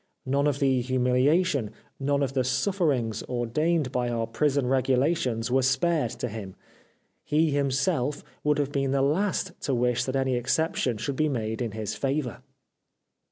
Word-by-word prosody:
None 140 +2 +1
of 145 -2 +1
the 135 -3 +2
humiliation, 130 - +2 0.3
none 140 +1 +1
of 135 - -2
the 130 -1 +1
sufferings 135 - 0
ordained 130 +5 0
by 125 -1 0
our 115 -1 -1
prison 140 +4 0
regulations 130 -1 +1
were 130 +1 +3
spared 145 +1 +1
to - - -4
him: 105 -4 -7 0.7
he, 155 +1 +2
himself, 140 +1 0 0.2
would 150 0 +2
have 145 -1 -1
been 135 -1 0
the 135 -1 +2
last 185 +5 0
to 135 - 0
wish 125 0 +1
that 130 - -3
any 130 -1 +1
exception 130 -1 0
should 135 +6 -3
be 155 0 +2
made 110 -3 -2
in 115 -4 -2
his 110 -1 -3
favour. 135 +1 -2
135 Hz, 160 wpm, -26 LUFS, 125-145 Hz, 0.7 s, were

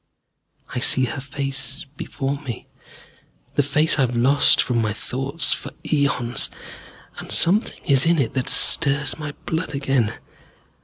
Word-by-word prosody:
I 125 - -2
see 130 +1 +2
her 125 +2 -5
face 135 +1 -5
before 140 +1 -4
me, 125 -6 -7 0.9
the - - +3
face 150 +3 +1
I - - +4
have 125 -2 0
lost 135 +4 +4
from 120 -2 +1
my 110 -2 -1
thoughts 135 +8 -2
for - - -7 0.2
eons, 130 -5 +1 0.7
and - - -8
something 195 +6 +3
is 140 -1 +3
in 170 0 +3
it 135 -6 0
that 130 -2 -2
stirs 145 0 +3
my 150 -1 -5
blood 160 -2 -3
again. 135 -5 0
140 Hz, 145 wpm, -22 LUFS, 125-145 Hz, 0.9 s, I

